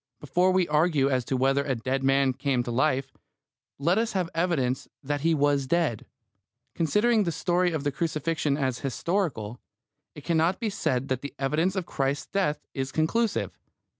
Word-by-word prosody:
Before 175 Hz, +6 st, +2 dB
we 185 Hz, -2 st, +2 dB
argue 150 Hz, -3 st, +2 dB
as 130 Hz, -1 st, +1 dB
to 130 Hz, -, -1 dB
whether 135 Hz, +2 st, +2 dB
a 135 Hz, -2 st, -1 dB
dead 130 Hz, +3 st, -2 dB
man 135 Hz, 0 st, +3 dB
came 135 Hz, -1 st, 0 dB
to 120 Hz, -, -4 dB
life, 135 Hz, +1 st, +1 dB, 0.6 s
let 170 Hz, +9 st, +2 dB
us 230 Hz, 0 st, -1 dB
have 180 Hz, -3 st, -1 dB
evidence 160 Hz, -7 st, 0 dB, 0.2 s
that 145 Hz, +1 st, -2 dB
he 165 Hz, +1 st, +3 dB
was 145 Hz, -2 st, +2 dB
dead. 155 Hz, -8 st, 0 dB, 0.7 s
Considering 210 Hz, +8 st, +2 dB
the 170 Hz, -, -1 dB
story 175 Hz, +3 st, +1 dB
of 155 Hz, -4 st, -2 dB
the 145 Hz, -, 0 dB
crucifixion 155 Hz, -1 st, -1 dB
as 130 Hz, -4 st, -1 dB
historical, 135 Hz, -, -2 dB, 0.6 s
it 150 Hz, -, -10 dB
cannot 165 Hz, +3 st, +1 dB
be 220 Hz, -3 st, -1 dB
said 130 Hz, -8 st, -1 dB
that 130 Hz, -1 st, -1 dB
the 140 Hz, 0 st, -7 dB
evidence 155 Hz, +8 st, 0 dB
of 190 Hz, -3 st, -2 dB
Christ's 140 Hz, -2 st, -1 dB
death 190 Hz, -7 st, -1 dB
is 135 Hz, -1 st, -3 dB
conclusive. 205 Hz, -, 0 dB
150 Hz, 170 wpm, -27 LUFS, 135-175 Hz, 0.7 s, man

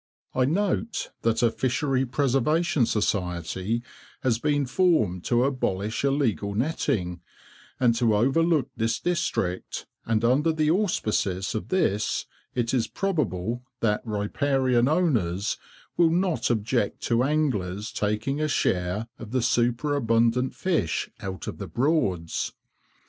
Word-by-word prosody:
I 130 Hz, -, +2 dB
note 205 Hz, -, -1 dB
that 115 Hz, +1 st, +1 dB
a 115 Hz, -, +4 dB
Fishery 130 Hz, +2 st, 0 dB
Preservation 140 Hz, +3 st, +2 dB
Society 95 Hz, +2 st, -1 dB, 0.4 s
has 120 Hz, -3 st, +2 dB
been 145 Hz, 0 st, +1 dB
formed 125 Hz, -, +2 dB
to 120 Hz, 0 st, +3 dB
abolish 110 Hz, -6 st, -1 dB
illegal 130 Hz, -8 st, 0 dB
netting, 100 Hz, -, -1 dB, 0.6 s
and 120 Hz, -2 st, +4 dB
to 115 Hz, -3 st, +3 dB
overlook 140 Hz, +4 st, +2 dB
this 115 Hz, -1 st, 0 dB
district, 160 Hz, -, -2 dB, 0.2 s
and 115 Hz, 0 st, +1 dB
under 145 Hz, +7 st, +3 dB
the 155 Hz, -1 st, +2 dB
auspices 110 Hz, -, 0 dB
of 110 Hz, -, -3 dB
this 105 Hz, -, 0 dB, 0.3 s
it 120 Hz, -1 st, 0 dB
is 120 Hz, -3 st, +1 dB
probable 120 Hz, -, -1 dB, 0.2 s
that 105 Hz, -2 st, +1 dB
riparian 125 Hz, +3 st, +1 dB
owners 115 Hz, -, +1 dB, 0.4 s
will 170 Hz, -2 st, +5 dB
not 175 Hz, 0 st, +1 dB
object 115 Hz, -1 st, 0 dB
to 120 Hz, 0 st, +1 dB
anglers 115 Hz, -9 st, 0 dB
taking 105 Hz, +8 st, -1 dB
a 155 Hz, -, +1 dB
share 90 Hz, -5 st, 0 dB
of 115 Hz, -, -8 dB
the 130 Hz, 0 st, 0 dB
superabundant 120 Hz, 0 st, +2 dB
fish 165 Hz, -, -1 dB
out 95 Hz, -1 st, -6 dB
of -, -, -6 dB
the -, -, -5 dB
Broads. 120 Hz, -, 0 dB
120 Hz, 120 wpm, -26 LUFS, 105-145 Hz, 0.6 s, will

